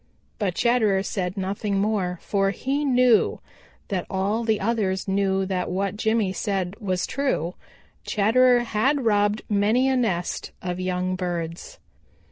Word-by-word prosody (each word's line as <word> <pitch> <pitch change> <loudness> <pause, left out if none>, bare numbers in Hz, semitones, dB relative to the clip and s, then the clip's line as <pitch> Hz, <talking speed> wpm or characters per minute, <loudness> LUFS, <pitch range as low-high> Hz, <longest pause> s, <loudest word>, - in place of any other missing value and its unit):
But 190 -5 -1
Chatterer 220 -5 +2
said 190 -1 -3
nothing 195 +1 -2
more, 195 -3 0
for 195 -1 +1
he 270 +8 -2
knew 250 -4 +3 0.5
that 190 -4 -2
all 200 +4 0
the 220 -2 +1
others 200 -3 -1
knew 195 0 +1
that 185 -1 -2
what 195 +2 -1
Jimmy 220 -3 +1
said 190 -2 -2
was 185 -4 -1
true: 260 - -1 0.5
Chatterer 245 +4 +4
had 240 +4 0
robbed 205 -1 +2
many 215 +5 +2
a 265 - +2
nest 190 -9 -1
of 180 0 -4
young 185 0 -1
birds. 175 - -4
200 Hz, 135 wpm, -24 LUFS, 185-230 Hz, 0.5 s, Chatterer